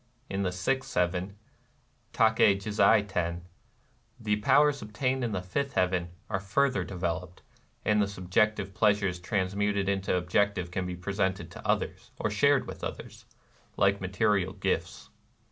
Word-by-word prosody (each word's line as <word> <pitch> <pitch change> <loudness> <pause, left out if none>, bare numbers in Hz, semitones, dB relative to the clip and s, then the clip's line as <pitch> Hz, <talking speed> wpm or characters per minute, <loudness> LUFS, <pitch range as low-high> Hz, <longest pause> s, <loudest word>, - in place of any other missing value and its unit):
In 95 0 -1
the 90 -2 0
sixth 130 +10 -2
heaven 90 +2 0 0.8
(^Tahe 110 -2 +4
jizai 105 +1 +3
Teri)^ 85 -3 -2 0.8
the 105 -2 0
powers 145 +6 +3
obtained 125 +5 -1
in 120 - -1
the 95 -3 -3
fifth 140 +9 -2
heaven 90 -2 +1 0.2
are 95 -3 -1
further 100 +2 +1
developed; 90 -1 -4 0.4
and 105 0 +3
the 100 - +2
subjective 100 +1 0
pleasures 100 -4 +2
trans 95 +1 -1
muted 100 -1 0
into 95 -1 0
objective 90 0 0
can 90 0 -2
be 90 - -4
presented 95 +1 -2
to - - -9
others, - - -1
or - - -1
shared - - +3
with - - -9
others, - - -7 0.3
— - - -33
like 100 0 +3
material 95 0 +1
gifts. - - -3
100 Hz, 145 wpm, -29 LUFS, 90-105 Hz, 0.8 s, ^Tahe